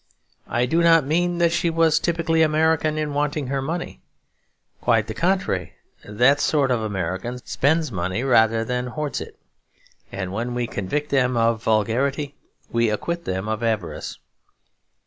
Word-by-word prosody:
I 120 Hz, +1 st, +1 dB
do 165 Hz, +7 st, +1 dB
not 165 Hz, -3 st, +5 dB
mean 175 Hz, +4 st, +1 dB
that 170 Hz, -1 st, +3 dB
she 175 Hz, 0 st, +1 dB
was 165 Hz, -1 st, +3 dB
typically 165 Hz, -1 st, +1 dB
American 155 Hz, 0 st, +2 dB
in 150 Hz, -1 st, -2 dB
wanting 145 Hz, 0 st, -1 dB
her 135 Hz, 0 st, -1 dB
money; 155 Hz, -, -4 dB, 0.8 s
quite 115 Hz, -3 st, +2 dB
the 110 Hz, -, -5 dB
contrary. 170 Hz, -, -1 dB, 0.3 s
That 125 Hz, +7 st, +3 dB
sort 140 Hz, -4 st, +2 dB
of 120 Hz, -2 st, +1 dB
American 100 Hz, +3 st, -3 dB
spends 155 Hz, +1 st, +1 dB
money 95 Hz, +4 st, -2 dB
rather 115 Hz, -3 st, +3 dB
than 125 Hz, +1 st, -2 dB
hoards 145 Hz, +1 st, -3 dB
it; -, -, -9 dB, 0.7 s
and 95 Hz, -1 st, -4 dB
when 120 Hz, +4 st, -3 dB
we 120 Hz, 0 st, 0 dB
convict 130 Hz, +9 st, -3 dB
them 125 Hz, -3 st, +2 dB
of 115 Hz, -1 st, +2 dB
vulgarity 130 Hz, +7 st, 0 dB, 0.4 s
we 115 Hz, -1 st, +2 dB
acquit 170 Hz, +11 st, -3 dB
them 95 Hz, +2 st, -3 dB
of 110 Hz, +1 st, -2 dB
avarice. 110 Hz, -5 st, -2 dB
130 Hz, 150 wpm, -23 LUFS, 110-155 Hz, 0.8 s, not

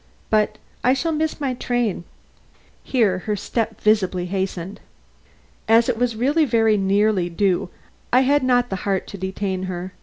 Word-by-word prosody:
But, 215 Hz, 0 st, +2 dB, 0.3 s
I 255 Hz, +2 st, +4 dB
shall 325 Hz, +5 st, -1 dB
miss 315 Hz, 0 st, -1 dB
my 275 Hz, -3 st, -1 dB
train." 240 Hz, -7 st, -2 dB, 0.8 s
Here 215 Hz, -8 st, +1 dB
her 210 Hz, +3 st, -2 dB
step 225 Hz, +3 st, -3 dB
visibly 190 Hz, -4 st, +1 dB
hastened. 190 Hz, 0 st, -4 dB, 0.9 s
As 230 Hz, +2 st, +4 dB
it 245 Hz, -, +1 dB
was 245 Hz, -2 st, 0 dB
really 285 Hz, +8 st, +2 dB
very 225 Hz, -5 st, +3 dB
nearly 200 Hz, -2 st, +2 dB
due, 180 Hz, 0 st, 0 dB, 0.4 s
I 255 Hz, -, +5 dB
had 285 Hz, +2 st, +3 dB
not 245 Hz, -2 st, +2 dB
the 190 Hz, -, -1 dB
heart 195 Hz, 0 st, -1 dB
to 200 Hz, -, -8 dB
detain 190 Hz, 0 st, -3 dB
her. 180 Hz, +1 st, -5 dB
215 Hz, 155 wpm, -22 LUFS, 190-245 Hz, 0.9 s, I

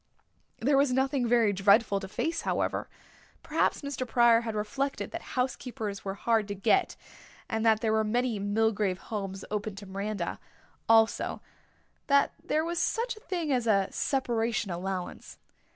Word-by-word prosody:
There 275 Hz, +3 st, +2 dB
was 280 Hz, -2 st, +3 dB
nothing 265 Hz, -1 st, +1 dB
very 230 Hz, -3 st, +3 dB
dreadful 200 Hz, +1 st, +4 dB
to 195 Hz, -, -7 dB
face, 325 Hz, -, -2 dB
however. -, -, -1 dB, 0.5 s
Perhaps -, -, 0 dB
Mr. 280 Hz, -3 st, -3 dB
Pryor 235 Hz, -1 st, +5 dB
had 225 Hz, -2 st, -4 dB
reflected 270 Hz, +7 st, -2 dB
that 335 Hz, -5 st, -7 dB
housekeepers 250 Hz, -5 st, -3 dB
were 195 Hz, 0 st, -4 dB
hard 225 Hz, 0 st, +1 dB
to 200 Hz, -, -4 dB
get 200 Hz, -, +2 dB, 0.5 s
and 225 Hz, 0 st, -2 dB
that 220 Hz, -1 st, +4 dB
there 220 Hz, -, +1 dB
were 220 Hz, 0 st, +3 dB
many 235 Hz, 0 st, 0 dB
Milgrave 205 Hz, -1 st, +1 dB
homes 195 Hz, -2 st, -5 dB
open 210 Hz, -1 st, -3 dB
to 200 Hz, +1 st, -9 dB
Miranda 195 Hz, -1 st, -4 dB, 0.5 s
also, 225 Hz, 0 st, +3 dB, 0.7 s
that 280 Hz, -1 st, +4 dB
there 310 Hz, +1 st, 0 dB
was 340 Hz, 0 st, -2 dB
such 470 Hz, +1 st, 0 dB
a -, -, -13 dB
thing 345 Hz, -7 st, -3 dB
as 245 Hz, -2 st, 0 dB
a 195 Hz, -3 st, +3 dB
separation 235 Hz, -6 st, -1 dB
allowance. 180 Hz, +1 st, -5 dB
225 Hz, 150 wpm, -29 LUFS, 200-260 Hz, 0.7 s, Pryor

